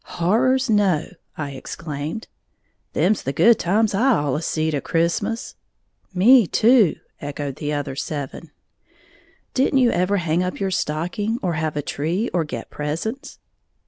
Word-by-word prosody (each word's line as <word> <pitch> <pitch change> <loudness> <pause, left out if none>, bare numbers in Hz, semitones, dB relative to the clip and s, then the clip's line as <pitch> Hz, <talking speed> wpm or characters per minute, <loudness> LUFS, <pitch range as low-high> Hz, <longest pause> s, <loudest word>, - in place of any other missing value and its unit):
"Horrors, 255 +9 +2
no!" 200 -8 +2 0.3
I 145 -2 -4
exclaimed. 150 - -6 0.7
"Them's 205 +3 +2
the 135 - -2
good 225 - +5
times 210 +5 +1
I 250 +7 +3
allus 145 - -1
seed 160 0 0
a 145 - -1
Christmas." 185 +7 -1 0.6
"Me, 215 +4 +6
too!" 225 -4 +4 0.3
echoed 145 -1 -5
the 150 0 -3
other 145 -2 -3
eleven. 150 +2 -6 1.0
"Didn't 270 +1 +2
you 250 -3 +4
ever 185 +3 +1
hang 170 -1 0
up 180 0 -3
your 195 -1 -1
stocking, 180 +7 -1
or 180 -2 0
have 155 -1 -2
a 145 - -1
tree 170 - -2
or 175 -2 +2
get 150 - -7
presents?" 220 - -4
175 Hz, 145 wpm, -22 LUFS, 150-220 Hz, 1.0 s, Me